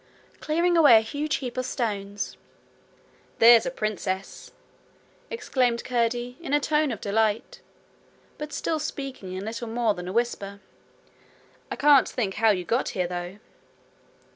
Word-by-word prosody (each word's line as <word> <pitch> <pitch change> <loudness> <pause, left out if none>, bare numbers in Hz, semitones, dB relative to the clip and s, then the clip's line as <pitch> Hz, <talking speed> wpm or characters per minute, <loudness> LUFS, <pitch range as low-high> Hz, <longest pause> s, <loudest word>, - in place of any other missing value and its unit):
'Clearing 340 +3 +1
away 290 -9 +8
a - - +4
huge 285 +7 -2
heap 255 -2 -5
of 255 - -1
stones.' 205 -4 -3 1.0
'There's 230 +1 +7
a - - +1
princess!' 195 -5 -4 0.8
exclaimed 250 - 0
Curdie, 245 0 -1
in 315 -5 -4
a - - +4
tone 300 0 +1
of 220 - -5
delight, 220 - -1 0.8
but 300 0 -6
still 315 +1 -2
speaking 270 -10 -6
in 190 +2 -5
little 230 +2 -5
more 225 -1 +1
than 180 -2 -7
a - - -4
whisper. 200 -3 -2 1.1
'I - - -3
can't 290 -2 +5
think 205 -6 -2
how 225 +2 +3
you 185 -4 +1
got 235 +7 0
here, 180 - +1
though.' 175 +2 -5
235 Hz, 140 wpm, -25 LUFS, 205-275 Hz, 1.1 s, away